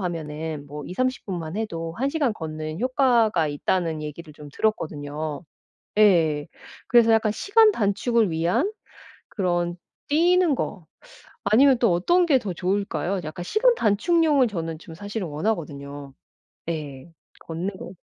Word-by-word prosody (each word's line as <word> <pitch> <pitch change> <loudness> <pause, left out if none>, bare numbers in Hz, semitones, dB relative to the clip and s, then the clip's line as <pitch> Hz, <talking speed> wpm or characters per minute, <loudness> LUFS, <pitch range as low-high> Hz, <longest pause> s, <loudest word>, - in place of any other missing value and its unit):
하면은 160 -4 -4
뭐 145 0 -8
20-30 255 +7 -2
분만 175 -2 -5
해도 165 -7 -4
1 270 +5 0
시간 280 -7 +1
걷는 155 -1 -5
효과가 240 - +2
있다.'는 160 +1 -1
얘기를 150 +1 -8
좀 150 -1 -11
들었거든요. 155 -6 -2 0.6
예. 165 -8 +4 0.4
그래서 235 -2 +5
약간 220 -1 +3
시간 430 - +4
단축을 220 - +1
위한 180 - +1 0.6
그런 175 -3 -1 0.3
뛰는 345 +1 +3
거 185 -6 -4 0.6
아니면 250 +5 +5
또 230 -7 +3
어떤 345 - +3
게 280 -5 +4
더 200 -4 -4
좋을까요? 185 0 -1
약간 155 +3 -6
시간 475 - +3
단축용을 285 - +3
저는 165 -5 -4
좀 165 - -11
사실은 205 0 -5
원하거든요. 145 -5 -4 0.6
예. 150 -2 -6 0.3
걷는 180 +4 -5
거 180 - -8
180 Hz, 265 characters per minute, -24 LUFS, 155-235 Hz, 0.6 s, 그래서